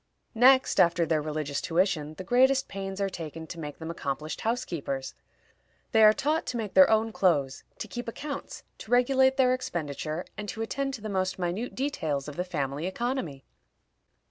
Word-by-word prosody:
Next 260 +3 +5
after 170 0 +4
their 160 -2 +1
religious 150 -1 -3
tuition, 165 -3 0
the 185 - -7
greatest 260 +5 +3
pains 195 0 -5
are 200 - +1
taken 165 -3 -7
to 165 - -8
make 150 -2 -6
them 160 0 -5
accomplished 155 -1 -4
housekeepers. 170 - -3 0.8
They 220 -1 +5
are 215 - +9
taught 295 +7 -1
to 245 - -2
make 215 -4 -4
their 280 - +7
own 220 +1 +2
clothes, 145 -10 +1
to - - -5
keep 240 -1 -6
accounts, 280 +4 -6 0.2
to - - -10
regulate 260 +2 +4
their 255 -1 +4
expenditure, 160 - -3
and 210 0 -6
to 225 - -3
attend 275 +4 -2
to 225 - -11
the 215 - -5
most 185 -1 -1
minute 185 +7 -3
details 160 - -2
of 150 - -7
the 180 - -1
family 150 -3 -3
economy. 190 - -3
190 Hz, 175 wpm, -28 LUFS, 155-245 Hz, 0.8 s, are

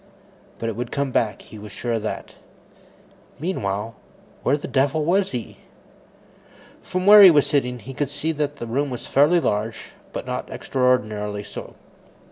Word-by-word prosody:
But 115 - -4
it 115 - -2
would 120 0 -5
come 140 -1 -1
back; 105 -5 0
he 110 - -12
was 105 -1 -10
sure 120 +5 -4
of 115 -1 0
that. 110 - -5 1.1
Meanwhile, 110 - -2 0.5
where 140 - +2
the 145 - -7
devil 140 +3 +1
was 190 +3 +2
he? 120 -3 -6 1.2
From 185 0 -3
where 210 +1 +10
he 195 - +11
was 150 -4 +5
sitting, 125 -4 0
he 125 +4 -9
could 140 +1 -2
see 155 +2 -2
that 150 -2 -2
the 120 - -6
room 135 +5 -1
was 125 -2 -6
fairly 150 +6 +4
large, 110 -5 -2 0.2
but - - -5
not - - -4
extraordinarily 110 -5 0
so. - - -9
130 Hz, 165 wpm, -23 LUFS, 110-150 Hz, 1.2 s, he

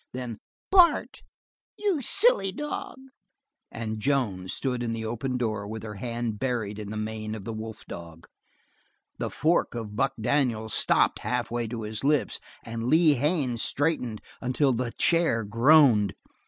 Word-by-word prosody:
Then: 125 -3 -5 0.3
"Bart, 360 -3 +4 0.6
you 395 -8 0
silly 400 - +4
dog!" 295 - -5 0.7
and 110 -1 -4
Joan 105 -8 0
stood 125 +5 -2
at 115 -1 -2
the 110 0 -4
open 120 +3 -2
door 110 -4 -2
with 110 +1 -6
her 105 -1 -6
hand 115 0 -4
buried 110 -5 -2
in 105 -1 -6
the 110 - -5
mane 110 0 -4
of 105 - -8
the 115 - -4
wolf 110 0 -7
dog. 85 -1 -10 0.9
The - - -2
fork 160 -4 +1
of 110 -3 -5
Buck 135 +4 +1
Daniels 110 -3 0
stopped - - +3
halfway 120 -1 -2
to 115 0 -5
his 105 +2 -5
lips 145 0 +1 0.3
and 115 0 -4
Lee 160 +2 +5
Haines 140 -4 0
straightened 130 -7 0 0.2
until 130 +2 +1
the 120 0 -2
chair 165 -9 +2
groaned. 115 -1 +5
120 Hz, 150 wpm, -27 LUFS, 110-140 Hz, 0.9 s, Lee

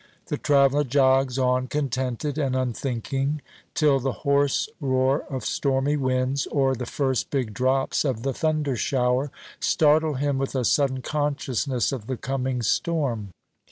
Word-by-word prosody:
The - - -1
traveller 140 0 +3
jogs 135 -1 +3
on 130 0 +1
contented 135 +1 -2
and 135 -3 0
unthinking, 135 +3 -2 0.3
till 145 -3 +3
the 135 +1 -1
hoarse 140 +3 +2
roar 130 0 +1
of 130 -2 -4
stormy 140 +1 +1
winds, 130 0 0
or 135 -2 +1
the 125 -1 -5
first 130 -4 -1
big 125 -7 -2
drops 130 +3 +1
of 125 -6 -2
the 135 0 -1
thunder 155 -2 0
shower, 125 +3 +1 0.3
startle 155 0 +3
him 140 0 0
with 135 0 -3
a 130 -2 0
sudden 130 -1 +1
consciousness 140 -3 -1
of 120 -6 -5
the 130 - -3
coming 130 -1 -2
storm. 120 - 0
135 Hz, 145 wpm, -25 LUFS, 130-145 Hz, 0.3 s, traveller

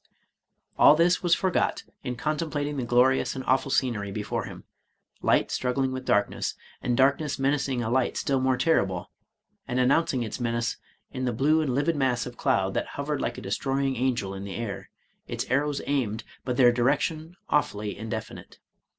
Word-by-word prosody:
All 145 - +8
this 175 +3 +3
was 175 -2 +4
forgot 185 -2 0 0.2
in 125 -2 -3
contemplating 150 +1 -2
the 125 - -2
glorious 125 +3 +3
and 130 - -5
awful 130 +1 +2
scenery 115 -7 0
before 105 +1 -3
him, - - -9 0.3
— - - -39
^light - - +3
struggling 130 +1 0
with 130 0 -5
darkness, 105 - +1
— - - -27
and 120 -1 0
darkness 140 +2 +2
menacing 135 -2 0
a 110 - -2
light 130 0 +1
still 135 -1 +1
more 130 -1 +2
terrible, 95 - +1 0.6
and 125 - -1
announcing 130 0 +2
its 110 - -5
menace 115 -1 -1 0.3
in 130 0 -3
the 125 - +1
blue 150 +7 +3
and 135 -5 -1
livid 150 +4 +1
mass 130 -4 +1
of 125 - -8
cloud 95 -3 +1
that - - -1
hovered 145 0 -2
like - - -2
a - - -6
destroying 135 0 -1
angel 120 -6 -1
in 95 0 -6
the 100 -1 -6
air, 115 -4 -5 0.4
its - - -3
arrows 145 +2 +1
aimed, 120 -6 -1 0.2
but 125 -1 -2
their 125 -2 +7
direction 150 +7 0
awfully 105 -8 0
indefinite. 110 +1 -7
130 Hz, 175 wpm, -26 LUFS, 120-145 Hz, 0.6 s, All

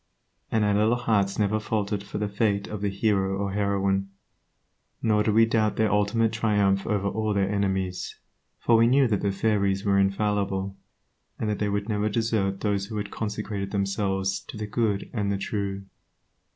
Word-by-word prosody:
And 110 -1 +2
our 105 - +2
little 110 +3 +3
hearts 105 -5 +1
never 105 0 +1
faltered 105 -2 -2
for 100 - -7
the 105 0 -1
fate 100 0 0
of 105 -2 -6
the 100 - 0
hero 95 -1 +1
or 100 0 -2
heroine, 100 -1 0 0.9
nor 105 -2 +2
did 105 0 +1
we 115 0 +7
doubt 110 -2 +1
their 110 -1 +2
ultimate 105 +2 +2
triumph 105 -3 +1
over 100 -2 0
all 110 0 -1
their 100 -1 +2
enemies, 95 -2 -2 0.4
for 115 - +3
we 115 +1 +5
knew 135 +2 +4
that 105 -4 0
the 100 - +1
fairies 100 -1 0
were 100 -1 +3
infallible, 100 -1 0 0.6
and 110 - -2
that 105 - -3
they 105 - 0
would 100 +1 -2
never 105 -1 0
desert 105 -3 0
those 100 -2 0
who 110 0 -5
had 100 -1 -4
consecrated 105 -2 -4
themselves 100 -1 -1
to - - -8
the 105 - -3
good 105 -2 -1
and 105 -3 -1
the 100 - 0
true. 100 -1 -3
100 Hz, 180 wpm, -26 LUFS, 100-110 Hz, 0.9 s, we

